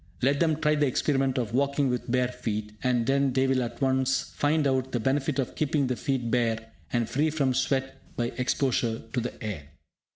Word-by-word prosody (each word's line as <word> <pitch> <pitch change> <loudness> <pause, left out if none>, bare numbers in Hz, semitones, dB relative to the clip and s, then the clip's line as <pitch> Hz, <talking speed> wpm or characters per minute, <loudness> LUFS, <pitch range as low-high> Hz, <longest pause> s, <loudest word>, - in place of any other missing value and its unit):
Let 140 +2 +3
them 160 -2 +3
try 150 -1 +3
the 145 -1 +2
experiment 135 0 +1
of 115 -3 -2
walking 140 +2 +2
with 125 -1 -2
bare 125 0 +2
feet, 110 -4 -4
and 125 -2 +1
then 135 0 +2
they 130 +1 +3
will 130 -1 +2
at 120 - -4
once 130 0 +1
find 150 +1 +2
out 130 -1 0
the 120 - +1
benefit 135 +4 0
of 135 -3 -1
keeping 150 -2 +1
the 125 -1 -1
feet 125 -3 -2
bare, 115 -2 0 0.2
and 120 -2 +1
free 150 +6 +1
from 140 -4 +1
sweat 135 +1 -1
by 120 0 -1
exposure 125 -3 0
to 125 - +1
the 120 - -6
air. 100 -10 -4
130 Hz, 200 wpm, -27 LUFS, 120-140 Hz, 0.2 s, Let